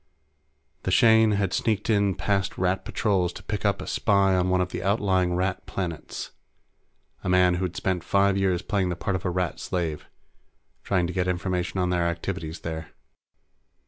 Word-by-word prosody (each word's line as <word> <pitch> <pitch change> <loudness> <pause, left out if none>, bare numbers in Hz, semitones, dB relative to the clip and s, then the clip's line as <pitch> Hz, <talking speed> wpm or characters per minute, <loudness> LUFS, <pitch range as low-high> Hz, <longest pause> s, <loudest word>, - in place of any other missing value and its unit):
The - - -3
Shane 110 -1 +5
had 100 -2 0
sneaked 110 -3 0
in 100 -4 +2
past 100 -1 -1
Rat 95 +1 0
patrols 95 -5 0
to - - -10
pick 105 -2 -4
up 100 -1 +1
a - - -8
spy 100 -2 +2
on 90 0 +1
one 90 0 +2
of 90 0 0
the - - -5
outlying 95 -3 +1
Rat 95 +1 -2
planets, 85 -4 -5 0.9
a 95 - -2
man 90 -1 +4
who'd 90 -2 -2
spent 90 -2 -1
five 100 +2 +3
years 95 -2 +1
playing 95 -3 0
the 90 - -2
part 95 +3 -2
of 95 - -4
a - - +1
Rat 90 -1 -2
slave, 80 -5 -3 0.8
trying 90 -2 +1
to 90 - -4
get 90 -1 0
information 90 +1 -1
on 90 0 +1
their 85 -1 +1
activities 85 -1 -4
there. 80 -1 -6
95 Hz, 175 wpm, -26 LUFS, 90-100 Hz, 0.9 s, Shane